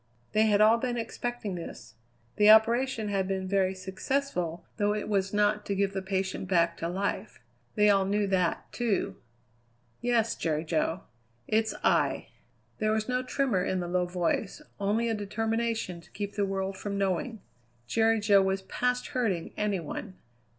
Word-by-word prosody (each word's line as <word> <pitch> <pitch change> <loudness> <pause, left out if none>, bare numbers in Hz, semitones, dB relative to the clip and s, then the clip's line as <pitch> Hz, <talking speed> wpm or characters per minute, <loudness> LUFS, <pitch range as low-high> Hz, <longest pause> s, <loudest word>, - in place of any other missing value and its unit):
They 215 +1 +3
had 210 -1 +4
all 220 +2 +6
been 245 0 -2
expecting 235 -2 -4
this. 170 -8 -8 0.4
The 210 0 +6
operation 230 +1 +5
had 195 -2 0
been 190 -1 -2
very 190 -1 +1
successful, 190 -2 -2
though 205 0 +1
it 210 - -3
was 195 -2 0
not 210 0 +2
to 200 - 0
give 195 0 0
the 190 - -2
patient 190 0 -2
back 170 -2 +2
to 165 - -3
life. 195 +3 -3 0.4
They 210 0 +4
all 195 -2 +4
knew 205 +1 +1
that, 185 -3 0
too. 235 -5 -1 0.8
"Yes, 235 -2 +2
Jerry 155 -1 -1
Jo, 165 +2 -1 0.5
it's 220 0 +1
I." - - +2 0.5
There 215 0 +1
was 215 0 0
no 250 0 0
tremor 255 -7 0
in 185 0 -1
the 175 - -3
low 180 0 0
voice, 180 +3 -1 0.2
only 210 +4 +1
a 225 - +1
determination 220 -2 -2
to - - -20
keep 205 0 -5
the 200 -1 0
world 195 0 -3
from 200 -1 -3
knowing. 200 +4 -1 0.5
Jerry 225 - +2
Jo 205 -2 +5
was 190 0 0
past 250 +5 -1
hurting 205 -10 -1
any 210 -3 0
one. 185 +4 -6
205 Hz, 165 wpm, -29 LUFS, 190-220 Hz, 0.8 s, all